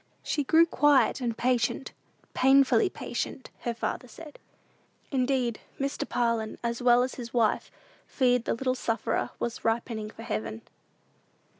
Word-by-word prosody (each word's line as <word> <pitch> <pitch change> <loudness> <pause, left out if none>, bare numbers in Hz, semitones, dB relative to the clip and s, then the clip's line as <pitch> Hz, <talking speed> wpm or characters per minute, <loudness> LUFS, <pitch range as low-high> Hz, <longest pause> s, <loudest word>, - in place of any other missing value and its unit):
She 295 - -1
grew 325 +4 +5
quiet 290 -3 +3
and 235 -2 -2
patient 250 +1 0 0.4
"painfully 275 +9 +4
patient," 260 - -5
her 240 - -2
father 250 +2 -3
said. 305 +3 -12 0.7
Indeed, 255 -3 0 0.2
Mr. 275 0 -2
Parlin, 230 -2 0
as 235 +1 -2
well 245 0 +5
as 255 - -3
his 240 -1 -8
wife, 230 -3 +2 0.4
feared 250 -3 +2
the - - 0
little 255 +2 0
sufferer 230 -2 -1
was 235 0 -4
ripening 225 -1 -1
for 225 - -11
heaven. 110 - -4
245 Hz, 135 wpm, -28 LUFS, 230-270 Hz, 0.7 s, grew